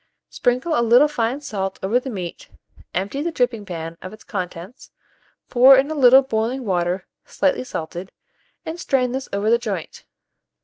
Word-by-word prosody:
Sprinkle 255 Hz, +7 st, 0 dB
a 240 Hz, -, +2 dB
little 240 Hz, +5 st, +5 dB
fine 260 Hz, -1 st, -2 dB
salt 195 Hz, -8 st, -4 dB
over 215 Hz, +6 st, +2 dB
the 265 Hz, -, -7 dB
meat, 185 Hz, -7 st, -7 dB, 0.4 s
empty 200 Hz, +10 st, -3 dB
the 340 Hz, +3 st, -2 dB
dripping 245 Hz, -7 st, -1 dB
pan 165 Hz, -2 st, -6 dB
of 185 Hz, -, -8 dB
its 215 Hz, -, -13 dB
contents, 185 Hz, +2 st, -7 dB, 0.6 s
pour 260 Hz, +2 st, +7 dB
in 275 Hz, +3 st, +1 dB
a -, -, -1 dB
little 265 Hz, -2 st, +6 dB
boiling 245 Hz, +1 st, -2 dB
water 180 Hz, -1 st, -1 dB, 0.2 s
slightly 280 Hz, -2 st, 0 dB
salted, 175 Hz, -4 st, -6 dB, 0.5 s
and 325 Hz, +2 st, -5 dB
strain 255 Hz, -6 st, 0 dB
this 265 Hz, +1 st, -4 dB
over 200 Hz, +2 st, 0 dB
the 235 Hz, -, +4 dB
joint. 200 Hz, -9 st, -5 dB
235 Hz, 165 wpm, -21 LUFS, 190-265 Hz, 0.6 s, pour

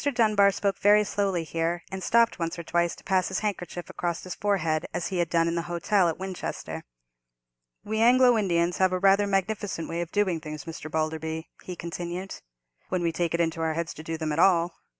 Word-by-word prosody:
Dunbar 215 Hz, -4 st, +5 dB
spoke 200 Hz, 0 st, -1 dB
very 210 Hz, +1 st, +5 dB
slowly 195 Hz, -4 st, -1 dB
here, 165 Hz, +2 st, -2 dB
and 190 Hz, 0 st, -5 dB
stopped 235 Hz, -1 st, +3 dB
once 165 Hz, 0 st, -2 dB
or 170 Hz, -, -5 dB
twice 170 Hz, +1 st, 0 dB
to -, -, -17 dB
pass 185 Hz, -1 st, +1 dB
his 190 Hz, -, -2 dB
handkerchief 180 Hz, -4 st, -4 dB
across 170 Hz, -1 st, -3 dB
his 185 Hz, -, -5 dB
forehead, 170 Hz, -6 st, 0 dB
as 175 Hz, -, -2 dB
he 185 Hz, -2 st, -2 dB
had 170 Hz, -2 st, +1 dB
done 165 Hz, -1 st, +2 dB
in 170 Hz, -, 0 dB
the 170 Hz, -, 0 dB
hotel 175 Hz, +2 st, +2 dB
at 160 Hz, -, -3 dB
Winchester. 190 Hz, -1 st, -5 dB, 1.0 s
"We 220 Hz, +1 st, -2 dB
Anglo 250 Hz, +1 st, +6 dB
Indians 175 Hz, -5 st, +1 dB
have 185 Hz, -1 st, +3 dB
rather 195 Hz, +2 st, +4 dB
a -, -, -3 dB
magnificent 195 Hz, -3 st, -1 dB
way 165 Hz, +1 st, -3 dB
of 175 Hz, -1 st, -5 dB
doing 190 Hz, -5 st, +1 dB
things, 155 Hz, -2 st, -7 dB
Mr. 160 Hz, -1 st, -7 dB
Balderby" 160 Hz, +1 st, -3 dB
he 180 Hz, -, -7 dB
continued, 175 Hz, +2 st, -5 dB, 0.6 s
"when 185 Hz, -2 st, -1 dB
we 170 Hz, -, +1 dB
take 170 Hz, 0 st, -1 dB
it -, -, -2 dB
into 165 Hz, -1 st, 0 dB
our 160 Hz, -1 st, 0 dB
heads 165 Hz, 0 st, -3 dB
to -, -, -9 dB
do 160 Hz, +1 st, -4 dB
them 155 Hz, -1 st, -2 dB
at 150 Hz, -, -1 dB
all. 175 Hz, -2 st, +4 dB
175 Hz, 210 wpm, -27 LUFS, 165-195 Hz, 1.0 s, Anglo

